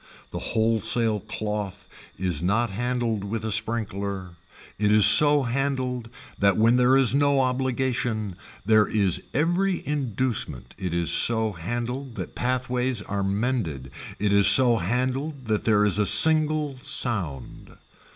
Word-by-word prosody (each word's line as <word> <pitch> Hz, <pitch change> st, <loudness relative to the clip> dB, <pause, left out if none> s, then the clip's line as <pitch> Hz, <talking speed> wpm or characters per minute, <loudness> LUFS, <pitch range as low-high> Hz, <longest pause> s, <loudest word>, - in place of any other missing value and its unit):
The -, -, -5 dB
wholesale 110 Hz, 0 st, 0 dB
cloth 100 Hz, -2 st, -6 dB, 0.3 s
is 90 Hz, -5 st, -2 dB
not 105 Hz, +5 st, 0 dB
handled 120 Hz, -1 st, -3 dB
with 110 Hz, +2 st, -5 dB
a 110 Hz, -, -3 dB
sprinkler, 100 Hz, -4 st, -2 dB, 0.5 s
it 105 Hz, 0 st, +1 dB
is 105 Hz, -1 st, +5 dB
so 145 Hz, -1 st, +6 dB
handled 130 Hz, -2 st, -3 dB, 0.3 s
that 100 Hz, -1 st, +2 dB
when 115 Hz, +3 st, +3 dB
there 125 Hz, +2 st, +3 dB
is 130 Hz, -3 st, +3 dB
no 140 Hz, -1 st, +2 dB
obligation 125 Hz, -5 st, -2 dB, 0.3 s
there 110 Hz, 0 st, +3 dB
is 100 Hz, -4 st, +1 dB
every 175 Hz, +4 st, -1 dB
inducement 130 Hz, -, -3 dB
it 90 Hz, -3 st, -4 dB
is 85 Hz, -2 st, +1 dB
so 110 Hz, +1 st, +2 dB
handled 120 Hz, +8 st, -6 dB
that -, -, -7 dB
pathways 125 Hz, -2 st, -2 dB
are 100 Hz, 0 st, -4 dB
mended, 100 Hz, -, -3 dB, 0.3 s
it 105 Hz, 0 st, -1 dB
is 100 Hz, 0 st, +5 dB
so 120 Hz, +3 st, +6 dB
handled 130 Hz, -, -3 dB
that 110 Hz, -2 st, -2 dB
there 105 Hz, -2 st, +2 dB
is 105 Hz, 0 st, +3 dB
a 105 Hz, -, +2 dB
single 155 Hz, -3 st, +4 dB
sound. 90 Hz, -, -2 dB
115 Hz, 135 wpm, -24 LUFS, 100-130 Hz, 0.5 s, so